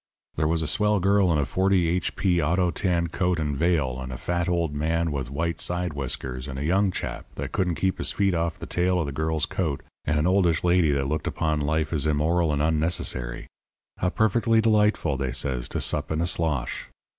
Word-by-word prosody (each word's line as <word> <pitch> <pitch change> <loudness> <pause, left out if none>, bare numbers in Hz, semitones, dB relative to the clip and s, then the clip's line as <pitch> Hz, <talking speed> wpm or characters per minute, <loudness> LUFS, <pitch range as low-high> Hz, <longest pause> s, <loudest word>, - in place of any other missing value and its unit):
There 75 - +1
was 80 0 0
a - - -2
swell 105 +1 +2
girl 100 -1 +3
in 80 - +2
a 75 - +1
40 95 0 +2
H. 85 0 -1
P. 90 -3 +2
auto 85 +3 +1
tan 85 -2 0
coat 90 +1 0
and 75 -2 -1
veil, 75 -5 +1
and 65 0 -6
a 65 - -5
fat 85 +4 -1
old 85 -4 0
man 80 +2 0
with 65 -4 -3
white 80 +4 -2
side 90 -1 -1
whiskers, 65 -2 -4
and 65 -1 -6
a 70 - -3
young 95 +4 +3
chap - - -5
that - - -5
couldn't 90 -3 0
keep 95 +2 -1
his - - +1
feet 100 -2 +1
off 85 -1 -1
the - - -7
tail 90 +1 +1
of 85 - 0
the 70 - -4
girl's 80 +2 -1
coat, 80 -9 -2 0.2
and 75 0 +1
an 75 - +1
oldish 90 -4 +2
lady 90 -2 +3
that 70 -1 +1
looked 75 +2 -2
upon 75 -2 -1
life 80 +2 0
as 75 -1 +1
immoral 80 +2 +2
and 75 0 0
unnecessary. 75 -6 -1 0.5
'How 90 - 0
perfectly 110 +3 +2
delightful,' 105 -9 +2
they 65 -1 -2
says, 65 -1 -2
'to - - -2
sup 75 0 -1
in 80 - 0
a 85 - +1
slosh.' 80 -7 -2
80 Hz, 215 wpm, -25 LUFS, 75-90 Hz, 0.5 s, girl